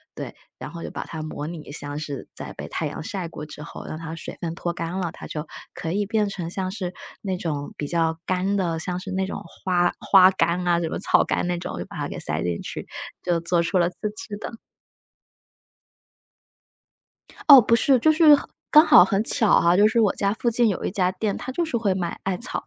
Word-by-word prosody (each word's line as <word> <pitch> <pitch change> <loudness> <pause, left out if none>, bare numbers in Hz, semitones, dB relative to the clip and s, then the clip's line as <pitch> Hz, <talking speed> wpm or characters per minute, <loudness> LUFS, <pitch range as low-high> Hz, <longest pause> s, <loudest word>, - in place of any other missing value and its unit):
对。 - - -7 0.2
然 - - -6
后 170 0 -8
就 - - -6
把 - - -5
它 160 -1 -6
模 150 -1 -5
拟 160 -3 -8
像 145 0 -6
是 145 -3 -6
在 - - -6
被 - - -7
太 - - -3
阳 - - -5
晒 185 +1 -4
过 150 -2 -8
之 150 0 -9
后， - - -9
让 155 - -5
它 160 0 -7
水 165 - -8
分 165 -1 -3
脱 175 +1 -3
干 170 +2 -4
了， 175 -3 -2
它 - - -11
就 150 0 -6 0.3
可 160 - -4
以 205 +3 0
变 210 0 0
成 185 -4 -5
像 185 0 -2
是 185 -2 -5 0.3
那 190 -2 -2
种 150 -5 -4
比 145 - -4
较 165 0 0
干 185 +2 0
的， 170 -4 -1
像 180 +2 -3
是 185 - -8
那 190 0 0
种 190 - -6 0.2
花 175 -1 +2
花 185 -2 +7
干 180 -1 0
啊， 170 -1 +3
什 170 - -2
么 - - -4
草 - - +4
干 - - -1
那 175 0 -1
种， 170 - -6
就 - - -4
把 - - -10
它 - - -2
给 - - -6
塞 - - -1
进 85 -1 -2
去， - - -7 0.4
就 175 -2 +1
做 170 +1 +1
出 180 +2 +1
了 175 0 +3
自 205 +4 -5
制 215 -2 -7
的。 - - -6 3.0
哦， 280 -3 +12
不 230 0 +3
是。 260 +3 +4
就 315 +7 +4
是 310 -1 +7
很 285 - -1 0.2
刚 305 +1 +8
好 180 - +8
很 195 +1 0
巧 225 -3 +4
哈， 170 +1 +4
就 205 +2 +6
是 220 +2 +2
我 210 -4 +3
家 200 0 +1
附 235 +1 0
近 235 0 +3
有 195 - -2
一 - - -1
家 185 -1 +1
店， 200 +1 -2
它 260 - -6
就 340 +6 0
是 315 -7 -2
会 210 -5 +1
卖 175 -2 -3
艾 195 -1 -1
草。 245 - -4
180 Hz, 250 characters per minute, -24 LUFS, 165-205 Hz, 3.0 s, 哦